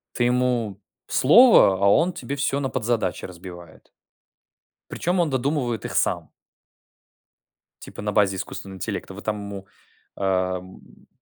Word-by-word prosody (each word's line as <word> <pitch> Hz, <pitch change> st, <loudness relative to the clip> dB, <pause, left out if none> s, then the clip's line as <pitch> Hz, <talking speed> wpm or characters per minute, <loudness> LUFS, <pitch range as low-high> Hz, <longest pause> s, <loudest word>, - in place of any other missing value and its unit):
Ты 120 Hz, -, +1 dB
ему 120 Hz, -5 st, 0 dB, 0.3 s
слово, 190 Hz, -, +6 dB
а -, -, +5 dB
он 170 Hz, -, +3 dB
тебе 140 Hz, -3 st, -6 dB
всё 140 Hz, 0 st, 0 dB
на 135 Hz, -, -2 dB
подзадачи 115 Hz, -8 st, -2 dB
разбивает. 85 Hz, -2 st, -12 dB, 1.0 s
Причем 180 Hz, +1 st, -1 dB
он 170 Hz, -, +2 dB
додумывает 130 Hz, -3 st, -1 dB
их -, -, -5 dB
сам. -, -, 0 dB, 1.5 s
Типа -, -, -9 dB
на 105 Hz, 0 st, -2 dB
базе 100 Hz, -2 st, +2 dB
искусственного 95 Hz, +1 st, -7 dB
интеллекта. 95 Hz, -1 st, -5 dB
Вы 100 Hz, -, -9 dB
там 105 Hz, 0 st, -2 dB
ему, 100 Hz, -1 st, -8 dB, 0.5 s
э, -, -, -5 dB
м 95 Hz, -1 st, -3 dB
110 Hz, 135 wpm, -23 LUFS, 95-135 Hz, 1.5 s, слово